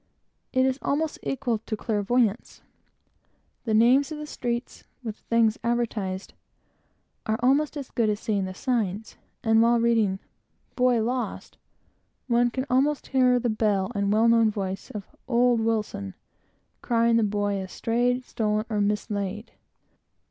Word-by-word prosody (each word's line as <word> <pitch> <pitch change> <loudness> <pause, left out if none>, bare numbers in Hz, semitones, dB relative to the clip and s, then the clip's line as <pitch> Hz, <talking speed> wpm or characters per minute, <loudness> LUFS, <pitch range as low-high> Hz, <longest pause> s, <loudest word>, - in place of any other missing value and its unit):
It 260 0 +3
is 265 +1 0
almost 305 +2 -1
equal 255 -5 -1
to 215 0 -5
clairvoyance. 220 +1 0 1.0
The 220 -2 +1
names 255 +7 +4
of 310 - -4
the 300 - -6
streets, 240 -4 -4 0.2
with 220 -3 -5
the - - -33
things 230 -2 +2
advertised, 220 -5 -2 0.9
are 220 0 +1
almost 285 +4 +2
as 275 -3 -7
good 225 -2 +1
as 205 -1 -1
seeing 205 -4 -1
the 185 0 -6
signs; 220 -4 -2 0.3
and 225 0 +4
while 235 +1 +4
reading 225 -5 +2 0.6
"Boy 250 -3 +3
lost!" 245 +2 -4 0.7
one 240 0 +3
can 260 +2 -3
almost 275 +3 +1
hear 250 -1 +4
the 245 0 -1
bell 210 -2 0
and 200 -2 0
well 220 +2 +4
known 230 -1 +5
voice 195 -2 -4
of 205 -3 -7 0.2
"Old 245 -1 +3
Wilson," 215 - -2 0.7
crying 230 -1 +2
the 230 - +3
boy 205 -1 0
as 190 -1 -7
"strayed, 245 +2 0
stolen, 215 -2 -1
or 210 -1 +1
mislaid!" 205 0 -2
230 Hz, 145 wpm, -26 LUFS, 210-245 Hz, 1.0 s, known